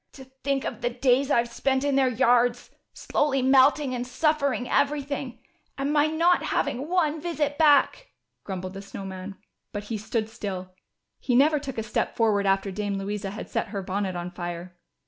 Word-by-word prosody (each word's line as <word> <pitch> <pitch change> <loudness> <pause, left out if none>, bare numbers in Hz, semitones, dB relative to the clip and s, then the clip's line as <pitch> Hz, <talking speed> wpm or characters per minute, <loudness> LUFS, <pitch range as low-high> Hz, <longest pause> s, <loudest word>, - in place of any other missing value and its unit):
" - - -51
To 265 - -11 0.2
think 275 -1 0
of - - -5
the 240 - +1
days 255 +2 +2
I've 235 -3 +1
spent 265 +2 0
in 285 -1 +1
their 270 -1 +4
yards, 245 0 +2 0.2
slowly 275 -3 0
melting 270 +1 +4
and 245 0 -3
suffering 280 -2 0
everything, 280 -3 -1 0.4
and 275 +2 -1
my 295 0 +4
not 335 +3 +3
having 275 +5 -1
one 320 -4 +1
visit 300 -3 -2
back," 305 - +4 0.3
grumbled 185 -1 -5
the 195 - -7
Snow 200 0 -8
Man. 190 +1 -7 0.3
But 205 -1 -5
he 215 - -2
stood 220 +1 -2
still; 190 -4 -6 0.5
he 250 - 0
never 300 +4 +4
took 270 -3 -7
a 225 - -1
step 215 - -2
forward 210 -3 +2
after 195 0 +1
Dame 200 0 -2
Louisa 200 0 -3
had 205 - -7
set - - -2
her 200 -1 -5
bonnet 190 0 -2
on 175 0 -4
fire. 175 0 -6
245 Hz, 185 wpm, -26 LUFS, 200-280 Hz, 0.5 s, their